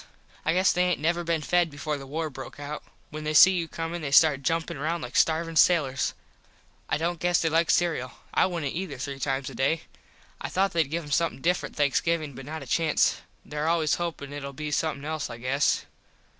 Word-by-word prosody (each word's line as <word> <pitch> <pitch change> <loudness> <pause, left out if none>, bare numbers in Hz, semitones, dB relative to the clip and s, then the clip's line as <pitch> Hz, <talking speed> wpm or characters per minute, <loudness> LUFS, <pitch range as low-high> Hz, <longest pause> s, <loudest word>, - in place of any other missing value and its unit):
I 155 - +2
guess 185 +1 +4
they 180 0 +2
aint 180 -1 +1
never 170 +3 0
been 165 -2 -1
fed 175 +2 +2
before 150 +1 -3
the 135 -1 -8
war 155 +2 -3
broke 135 +1 -9
out. 145 +1 -6 0.3
When 155 0 -6
they 155 0 -2
see 185 - +9
you 175 -3 -1
comin 165 +1 -4
they 145 - -3
start 140 0 +5
jumpin 165 0 -1
round 160 +3 -2
like 125 - -7
starvin 165 +1 +2
sailurs. 145 -7 +3 0.7
I - - +1
dont 170 +2 -2
guess 175 0 +2
they 165 - +1
like 165 +1 +2
cereul. 160 -8 +1 0.2
I - - +4
wouldnt 165 -7 -3
ether 165 -5 -4
three 135 +2 -5
times 135 -1 -2
a - - -10
day. 140 +5 0 0.6
I - - -3
thought 195 +1 +1
theyd 165 -4 +1
give 165 +2 -2
em 145 - -10
somethin 165 0 +1
different 180 +2 0
Thanksgivin 150 +1 +1
but 135 +1 -10
not 155 -1 -5
a - - -10
chance. 160 +5 +2 0.3
There 150 +1 -3
always 165 -2 +2
hopin 150 -5 -4
it 145 -1 -6
ull 140 0 -6
be 150 +1 -5
somethin 145 -2 -1
else 155 -3 -3
I 115 - -7
guess. 130 +4 +1
155 Hz, 215 wpm, -27 LUFS, 140-170 Hz, 0.7 s, see